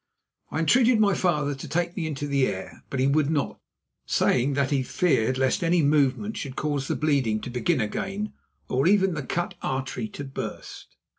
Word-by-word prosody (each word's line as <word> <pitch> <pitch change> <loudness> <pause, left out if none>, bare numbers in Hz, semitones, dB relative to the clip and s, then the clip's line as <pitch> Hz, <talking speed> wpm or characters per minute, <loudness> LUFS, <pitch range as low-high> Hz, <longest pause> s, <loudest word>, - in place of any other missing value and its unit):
I - - -4
entreated 235 +8 +4
my 205 -2 +4
father 150 -7 +1
to 135 - -8
take 175 +1 -1
me 165 -4 -2
into 145 -2 -4
the 140 -2 +2
air, 95 - -6
but 135 - -3
he 130 - +3
would 145 +1 +2
not, 150 -4 -1 0.5
saying 130 +3 +2
that 140 0 +1
he 140 -2 +2
feared 130 -4 +1
lest 130 +5 +1
any 170 -1 +3
movement 145 +8 +2
should 135 -3 -5
cause 145 -3 -2
the - - 0
bleeding 135 -8 +1
to 125 - -6
begin 130 +5 +1
again 195 - -3 0.3
or 135 +5 +1
even 190 -1 +4
the 155 - -3
cut 175 +7 -2
artery 130 -3 -3
to 145 - -7
burst. 135 -1 -7
145 Hz, 190 wpm, -26 LUFS, 130-175 Hz, 0.5 s, entreated